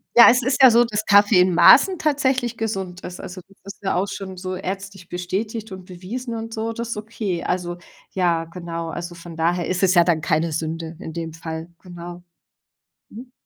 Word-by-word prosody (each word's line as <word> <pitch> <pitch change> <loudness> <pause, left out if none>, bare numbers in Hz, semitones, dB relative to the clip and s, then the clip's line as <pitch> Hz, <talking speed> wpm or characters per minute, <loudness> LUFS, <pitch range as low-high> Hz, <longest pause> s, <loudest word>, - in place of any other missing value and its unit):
Ja, 235 - +10
es 250 +1 +4
ist 260 +3 0
ja 260 -2 +9
so, 235 +1 +5
dass 215 -2 -3
Kaffee 205 -1 +5
in 180 0 +4
Maßen 330 - +6
tatsächlich 260 -5 0
gesund 190 -5 -4
ist. 180 - -8
Also, 185 +1 -8
das 195 - -23 0.2
ist - - -32
ja 190 - 0
auch 185 +3 0
schon 190 -1 -7
so 185 0 -5
ärztlich 195 -1 -6
bestätigt 205 +5 -4
und 185 -1 -9
bewiesen 220 +7 -6
und 225 0 -6
so, 225 +1 -3
das 235 +1 -5
ist 230 - -4
okay. 210 -5 -4
Also 175 -1 -2 0.3
ja, 170 -3 0
genau. 170 -1 -6
Also 175 +1 -6
von 170 0 -11
daher 170 +2 0
ist 185 +1 -1
es 185 -1 +4
ja 175 -2 +6
dann 165 -2 +1
keine 160 +1 0
Sünde 160 +1 -4
in 160 - -8
dem 165 -1 -5
Fall, 160 0 -7
genau. 175 -1 -10 0.9
Mhm. 245 +3 -11
185 Hz, 200 wpm, -22 LUFS, 175-225 Hz, 0.9 s, Ja